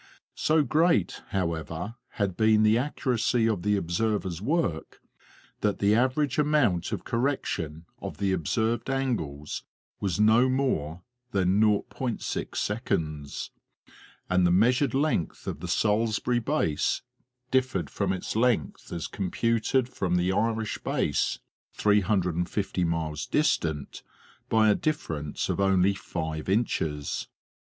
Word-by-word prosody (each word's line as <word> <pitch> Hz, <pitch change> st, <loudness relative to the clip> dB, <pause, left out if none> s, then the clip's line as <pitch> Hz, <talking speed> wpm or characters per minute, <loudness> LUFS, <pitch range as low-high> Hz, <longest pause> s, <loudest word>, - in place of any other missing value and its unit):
So 155 Hz, 0 st, +2 dB
great, 155 Hz, -, +2 dB
however, 85 Hz, +2 st, -3 dB, 0.2 s
had 100 Hz, -5 st, -1 dB
been 110 Hz, +1 st, +4 dB
the 110 Hz, +1 st, +5 dB
accuracy 120 Hz, -3 st, +1 dB
of 110 Hz, -6 st, 0 dB
the 105 Hz, +2 st, +2 dB
observers' 95 Hz, 0 st, -1 dB
work, 135 Hz, -, -1 dB, 0.6 s
that 105 Hz, -2 st, 0 dB
the 100 Hz, +1 st, +3 dB
average 130 Hz, +4 st, +2 dB
amount 145 Hz, -, +2 dB
of -, -, -3 dB
correction 100 Hz, -, -2 dB, 0.2 s
of -, -, -6 dB
the 100 Hz, 0 st, 0 dB
observed 110 Hz, -, 0 dB
angles 110 Hz, -, -2 dB, 0.4 s
was 95 Hz, -1 st, -1 dB
no 110 Hz, +4 st, +5 dB
more 90 Hz, -, -1 dB, 0.3 s
than 95 Hz, +1 st, +3 dB
0.6, 105 Hz, -, -1 dB, 0.8 s
and 90 Hz, -1 st, +3 dB
the -, -, +2 dB
measured 125 Hz, +9 st, +3 dB
length 140 Hz, -, 0 dB
of -, -, -4 dB
the -, -, -6 dB
Salisbury 110 Hz, +3 st, +1 dB
base 115 Hz, -, 0 dB, 0.5 s
differed 125 Hz, -, +1 dB
from -, -, -1 dB
its 95 Hz, +2 st, -3 dB
length 115 Hz, -, 0 dB
as 85 Hz, -2 st, -3 dB
com 95 Hz, -3 st, -3 dB
puted 115 Hz, +4 st, +1 dB
from 95 Hz, -8 st, -1 dB
the 90 Hz, +1 st, +2 dB
Irish 110 Hz, +1 st, 0 dB
Base, -, -, 0 dB, 0.4 s
350 95 Hz, -2 st, +1 dB
miles 80 Hz, -2 st, -2 dB
distant, 80 Hz, -, 0 dB, 0.5 s
by 110 Hz, -1 st, +4 dB
a 105 Hz, -, +6 dB
difference 80 Hz, -, -2 dB
of -, -, -2 dB
only 95 Hz, 0 st, +3 dB
five 80 Hz, -4 st, -4 dB
inches. 80 Hz, -9 st, -1 dB
105 Hz, 120 wpm, -27 LUFS, 85-120 Hz, 0.8 s, a